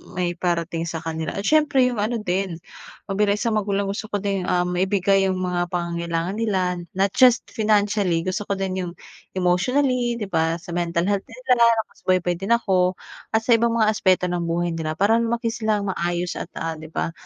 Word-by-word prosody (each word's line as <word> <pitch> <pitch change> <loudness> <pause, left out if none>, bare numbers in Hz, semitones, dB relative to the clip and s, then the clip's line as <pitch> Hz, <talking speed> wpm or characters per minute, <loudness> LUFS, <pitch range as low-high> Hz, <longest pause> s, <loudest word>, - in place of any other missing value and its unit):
maiparating 170 -2 -1
sa 165 -1 -5
kanila. 160 -1 -4
At 200 - -3
siyempre 295 0 +3
yung 240 - -4
ano 225 +3 0
din, 185 -1 -1 0.5
na - - -5
bilang 205 -1 +3
isang 220 +1 -1
magulang, 200 -1 -1
gusto 205 +2 -4
ko 205 - -2
din, 195 -2 -1
um, 180 0 +1
maibigay 195 +1 +2
yung 190 - 0
mga 180 -1 -1
pangangailangan 170 +1 -2
nila, 215 -4 +1 0.4
not 195 +1 +2
just 250 -2 +6
financially, 205 -6 +1
gusto 185 +3 -2
ko 200 - 0
din 190 -1 -2
yung 175 - -6 0.4
emotionally 240 +7 +1
'di 210 - -3
ba? 160 0 +1
Sa 175 - -10
mental 170 -1 0
health 200 -1 0
din 230 - -12
nila 240 -2 +5 0.2
nakasubaybay 185 -4 -1
din 195 +4 -3
ako 185 -5 +1 0.4
at 220 - +2
sa 235 +1 +5
ibang 235 0 +1
mga 220 -2 +3
aspeto 190 -4 +2
ng 175 -1 -1
buhay 170 +1 0
nila 155 -1 -3
para 210 +6 +3
lumaki 230 0 -1
silang 215 -4 -1
maayos 175 0 -2
at, - - -5
ah, 165 0 -3
'di 160 - -9
ba, - - -1
190 Hz, 190 wpm, -23 LUFS, 175-215 Hz, 0.5 s, just